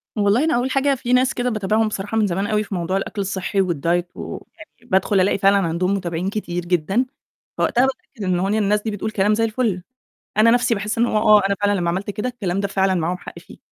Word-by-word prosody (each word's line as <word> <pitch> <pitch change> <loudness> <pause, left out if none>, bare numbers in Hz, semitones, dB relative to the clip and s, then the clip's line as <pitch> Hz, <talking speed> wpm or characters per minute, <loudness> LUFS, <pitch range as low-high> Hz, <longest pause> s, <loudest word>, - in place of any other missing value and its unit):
والله 210 +6 +2
أنا 320 - +2
أول 255 +2 0
حاجة 275 0 +2
في 250 -1 -2
ناس 255 +1 +3
كده 245 0 -1
باتابعهم 215 0 +1
بصراحة 205 +1 -3
من 210 -2 +3
زمان 195 +3 -1
أوي 215 0 +1
في 200 - -6
موضوع 180 +2 -1
الأكل 200 +1 -4
الصحي 195 0 -1
والdiet، 170 +2 0
ويعني - - -6 0.4
بادخل 190 +1 +1
ألاقي 195 - +2
فعلًا 195 +1 +4
عَندهم 180 +1 0
متابعين 180 -1 -2
كتير 175 -4 -4
جدًا، 185 +8 +1 0.5
فوقتها 250 +2 +3
باتأكد 255 -4 -6
إن 180 -1 +1
هو 190 +2 0
إن 210 - +1
الناس 210 -1 +1
دي 220 - -2
بتقول 210 +1 -3
كلام 210 0 +2
زي 225 +1 +1
الفُل. 220 -5 -1 0.5
أنا 225 +2 +6
نَفْسي 245 0 +3
باحس 210 +2 -3
إن 235 - +3
هو 215 - -1
آه 210 -1 +5
أنا 200 - +1
فعلًا 205 -1 +2
لمّا 170 -1 0
عملت 195 +3 -3
كده 210 +4 -3
الكلام 195 -6 -3
ده 200 - -1
فعلًا 190 -1 +1
معاهم 175 +1 -1
حق - - -10
فيه، - - -15
205 Hz, 230 wpm, -21 LUFS, 185-225 Hz, 0.5 s, أنا